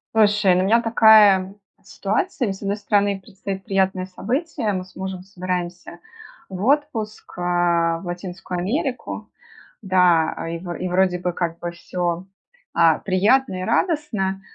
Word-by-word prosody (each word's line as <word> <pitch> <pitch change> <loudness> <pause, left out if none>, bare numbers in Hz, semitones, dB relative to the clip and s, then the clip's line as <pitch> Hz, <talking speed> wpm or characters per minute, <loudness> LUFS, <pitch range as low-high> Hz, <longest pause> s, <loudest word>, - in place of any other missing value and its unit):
Слушай, 210 -3 +4
у - - +2
меня 230 +4 +4
такая 215 -4 +5 0.3
ситуация. 215 - -2
С 195 - -13
одной 200 +1 -2
стороны 205 -1 +1
предстоит 190 0 -7
приятное 190 -2 0
событие. 240 - -2
Мы 185 -1 -3
с 185 - -20
мужем 190 -1 -5
собираемся 180 -2 -5 0.5
в 190 0 -5
отпуск, 260 -6 -1
э, - - -5
в 170 -1 +1
Латинскую 180 0 -5
Америку. 255 - -3 0.5
Да, 180 -5 +2
и 170 - -3
вро 175 0 -6
вроде 180 0 +2
бы 180 0 -2
как 170 -1 -3
бы 175 - -4
всё, 175 0 -3 0.5
а, 165 -2 +4
приятно 200 +3 +2
и - - -3
радостно. 225 - 0
190 Hz, 135 wpm, -22 LUFS, 180-215 Hz, 0.5 s, такая